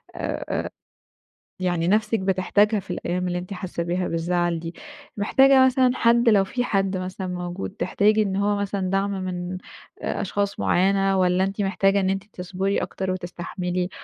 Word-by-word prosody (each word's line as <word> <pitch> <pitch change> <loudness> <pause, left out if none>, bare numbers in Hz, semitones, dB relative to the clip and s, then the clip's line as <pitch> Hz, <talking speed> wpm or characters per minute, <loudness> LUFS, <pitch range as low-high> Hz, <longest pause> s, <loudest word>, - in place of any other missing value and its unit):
أ - - -3
أ - - -4 0.9
يعني 175 -2 0
نفسِك 215 +2 +2
بتحتاجها 200 +3 +2
في 195 - -8
الأيام 180 +1 -2
اللي 175 0 -1
أنتِ 180 +3 -6
حاسة 180 -2 -4
بيها 180 +1 -1
بالزعل 170 0 0
دي. 165 +1 -6 0.4
محتاجة 265 +5 +5
مثلًا 255 -1 +3
حد 235 0 +4
لو 200 -3 +5
في 245 +6 -2
حد 195 -3 0
مثلًا 185 +1 -5
موجود 180 +1 -4
تحتاجي 215 +1 +2
إن 195 -2 -1
هو 205 +1 +1
مثلًا 200 -2 -2
دَعم 195 +1 0
من 180 0 -4 0.4
آآ - - -2
أشخاص 200 +1 -2
معيّنة، 195 +1 +2
والّا 180 +1 +3
أنتِ 195 +2 -2
محتاجة 195 0 +2
إن 190 -1 +1
أنتِ 195 0 -1
تصبري 190 +2 -2
أكتر 190 -1 -3
وتستحملي؟ 180 0 -3
190 Hz, 160 wpm, -24 LUFS, 180-200 Hz, 0.9 s, محتاجة